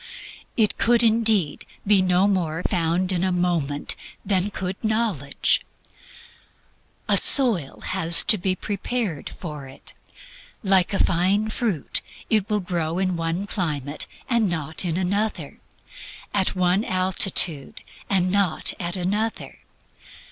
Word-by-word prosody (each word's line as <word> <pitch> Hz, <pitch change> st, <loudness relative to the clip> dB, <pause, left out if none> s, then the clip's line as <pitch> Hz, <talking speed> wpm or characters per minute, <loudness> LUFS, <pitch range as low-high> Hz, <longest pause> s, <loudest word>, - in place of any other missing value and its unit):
It 215 Hz, -3 st, +1 dB
could 235 Hz, 0 st, +3 dB
indeed 220 Hz, -8 st, +2 dB, 0.2 s
be 200 Hz, -1 st, +4 dB
no 185 Hz, +1 st, +2 dB
more 175 Hz, -4 st, -1 dB
found 175 Hz, +1 st, 0 dB
in 180 Hz, -1 st, -1 dB
a 190 Hz, -, +1 dB
moment 170 Hz, -5 st, -1 dB, 0.3 s
than 195 Hz, -1 st, 0 dB
could 190 Hz, -1 st, -6 dB
knowledge. 215 Hz, -, 0 dB, 1.5 s
A -, -, +3 dB
soil 220 Hz, -, +4 dB
has 170 Hz, -3 st, +5 dB
to 215 Hz, -, +3 dB
be 185 Hz, +1 st, -1 dB
prepared 205 Hz, -, -3 dB
for 150 Hz, -6 st, -8 dB
it. 135 Hz, -, -12 dB, 0.7 s
Like 190 Hz, -3 st, +3 dB
a -, -, +2 dB
fine 190 Hz, +5 st, +1 dB
fruit, 215 Hz, -, -2 dB, 0.3 s
it 215 Hz, -3 st, +1 dB
will 210 Hz, -1 st, 0 dB
grow 170 Hz, -2 st, -3 dB
in 185 Hz, -1 st, 0 dB
one 165 Hz, +3 st, -2 dB
climate, 150 Hz, -7 st, -3 dB, 0.2 s
and 235 Hz, -5 st, +1 dB
not 160 Hz, -1 st, -3 dB
in 170 Hz, -2 st, -2 dB
another; 200 Hz, +4 st, -2 dB, 0.7 s
at 195 Hz, -2 st, 0 dB
one 185 Hz, +2 st, +1 dB
altitude, 185 Hz, -, +1 dB, 0.3 s
and 185 Hz, -2 st, +1 dB
not 195 Hz, -5 st, +1 dB
at 175 Hz, 0 st, -2 dB
another. 205 Hz, +5 st, -3 dB
185 Hz, 125 wpm, -23 LUFS, 170-205 Hz, 1.5 s, has